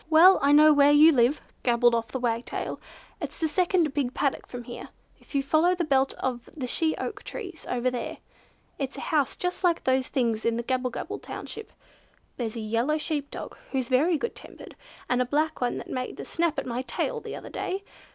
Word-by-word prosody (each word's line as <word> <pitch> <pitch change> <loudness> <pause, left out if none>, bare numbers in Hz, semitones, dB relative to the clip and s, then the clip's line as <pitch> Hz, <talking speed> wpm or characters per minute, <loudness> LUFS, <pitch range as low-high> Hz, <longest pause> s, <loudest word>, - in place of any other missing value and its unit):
"Well! 340 +4 +8
I 280 - +4
know 305 +1 +8
where 285 -1 +6
you 300 +2 +8
live," 255 +1 +2 0.2
gabbled 240 -1 +4
off 230 -1 0
the 240 - -4
Wagtail. 235 -1 -2 0.4
"It's - - -5
the 320 - +1
second 345 -1 +2
big 270 -4 -1
paddock 275 - -1
from 245 -1 -7
here, 240 0 -8 0.3
if - - -14
you 275 - +2
follow 320 +6 +3
the 350 - -1
belt 270 -3 +2
of 245 -2 -3
the 285 -6 -4
she 315 +5 0
oak - - -4
trees 370 -8 -8
over 250 +1 0
there. 245 - -4 0.6
It's 275 0 -3
a - - -5
house 295 -4 +1
just 360 +1 -3
like 345 -2 +2
those 260 0 +2
things 230 -5 0
in 230 0 +1
Gabblebabble 250 +1 -2
township. 445 - -8 0.7
There's 230 -3 -3
a 230 - -4
yellow 230 +8 0
sheep 300 -2 -2
dog, - - -7 0.2
who's 260 -3 -1
very 305 +7 +3
good 470 - -3
tempered, - - -12 0.3
and 250 0 +2
a - - +4
black 300 +4 0
one 245 - 0
that - - -7
made 255 -1 -4
a - - -5
snap 335 -3 0
at - - -2
my 245 0 -2
tail 465 - -2
the - - -6
other - - -8
day. 390 +2 -3
275 Hz, 205 wpm, -27 LUFS, 245-315 Hz, 0.7 s, Well